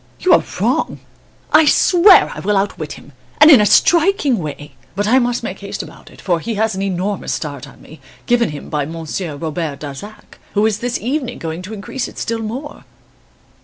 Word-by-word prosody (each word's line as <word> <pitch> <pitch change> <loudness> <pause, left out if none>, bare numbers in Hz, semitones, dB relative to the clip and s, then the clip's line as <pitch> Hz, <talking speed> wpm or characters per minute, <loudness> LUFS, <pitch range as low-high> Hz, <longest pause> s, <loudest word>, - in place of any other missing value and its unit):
"you 370 - +3
are - - +5 0.2
wrong! - - 0 0.5
I 310 +1 +7
swear 365 +5 +5
I - - -8
will 205 +1 0
outwit 185 -6 -2
him 145 - -14 0.3
and 300 +2 +9
in 260 -7 +8
a 210 - +3
striking 330 - +3
way! 145 -2 -7 0.2
But 205 +1 -1
I 255 +4 +5
must 245 -1 -1
make 190 -3 -5
haste 200 0 -6
about - - -14
it, - - -17
for 175 -3 0
he 230 +6 -4
has 220 +1 0
an 190 - -4
enormous 195 +1 -2
start 145 -3 -6
on - - -17
me 155 - -15 0.2
given 240 -3 +2
him 150 -1 -8
by 150 -2 -2
Monsieur 165 +1 -5
Robert 155 -1 -4
Darzac, 150 +9 -10 0.2
who 205 +1 +3
is 220 -1 0
this 245 +1 -2
evening 255 0 -3
going 165 +1 -5
to 195 +4 -8
increase 215 +6 -5
it - - -13
still 230 0 -3
more. 255 +7 -6
205 Hz, 200 wpm, -17 LUFS, 165-245 Hz, 0.5 s, and